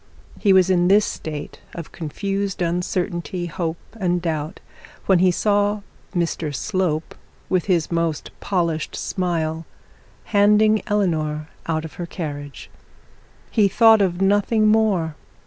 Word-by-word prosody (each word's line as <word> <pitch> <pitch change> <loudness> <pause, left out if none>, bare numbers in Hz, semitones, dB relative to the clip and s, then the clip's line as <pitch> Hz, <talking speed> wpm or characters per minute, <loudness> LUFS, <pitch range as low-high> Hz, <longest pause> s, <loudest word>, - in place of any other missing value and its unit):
He 200 - +3
was 190 -1 +5
in 175 -1 +3
this 205 +2 +5
state 150 -2 -6 0.2
of 165 -4 -7
confused 195 +4 -3
uncertainty, 175 0 -2
hope, 165 0 -3 0.2
and 180 -2 +1
doubt, 160 -1 -3 0.5
when 190 -3 +4
he 185 +1 +5
saw 205 +2 +1 0.3
Mr 165 -4 -1
Slope, 180 -3 -1 0.4
with 185 -2 +1
his 175 -5 +1
most 165 -2 -1
polished 170 -5 -1
smile, 165 -4 -2 0.6
handing 210 +1 +4
Eleanor 155 -7 0 0.2
out 160 -1 -1
of 160 - -9
her 170 - -4
carriage. 145 -5 -7 0.8
He 210 -3 +4
thought 220 +2 +6
of 185 -1 +1
nothing 205 +2 +3
more. 210 -7 +2
180 Hz, 125 wpm, -22 LUFS, 160-200 Hz, 0.8 s, thought